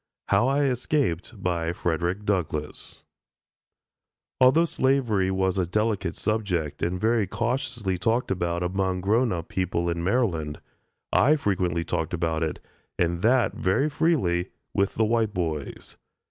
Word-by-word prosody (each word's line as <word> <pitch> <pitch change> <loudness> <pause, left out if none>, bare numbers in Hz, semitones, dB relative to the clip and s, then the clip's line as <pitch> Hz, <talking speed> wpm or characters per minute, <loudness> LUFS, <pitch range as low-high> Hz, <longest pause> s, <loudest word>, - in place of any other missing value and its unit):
HOW 100 +5 +4
I 140 +2 +2
ESCAPED 125 - -1 0.4
FREDERICK 90 +5 -1
DOUGLASS 80 -7 -3 1.4
Although 130 +6 +6
slavery 125 - +1
was 95 0 0
a 90 - 0
delicate 105 -2 0
subject, 95 -9 -2
and 90 +2 -1
very 110 -1 +2
cautiously 115 -4 -2
talked 115 +5 0
about 85 -2 -1
among 95 0 -1
grown 110 +6 +2
up 85 -2 -3
people 85 -2 -1
in 85 0 -3
Maryland, 85 -8 0 0.5
I 145 +5 +5
frequently 90 - 0
talked 80 +2 -2
about 80 -1 -1
it, 80 -1 -2 0.4
and 85 0 0
that 125 +4 +3
very 135 +12 +1
freely, 125 - +1 0.2
with 100 0 +1
the 110 - +2
white 110 -2 +1
boys. 80 -5 -4
95 Hz, 130 wpm, -26 LUFS, 85-115 Hz, 1.4 s, Although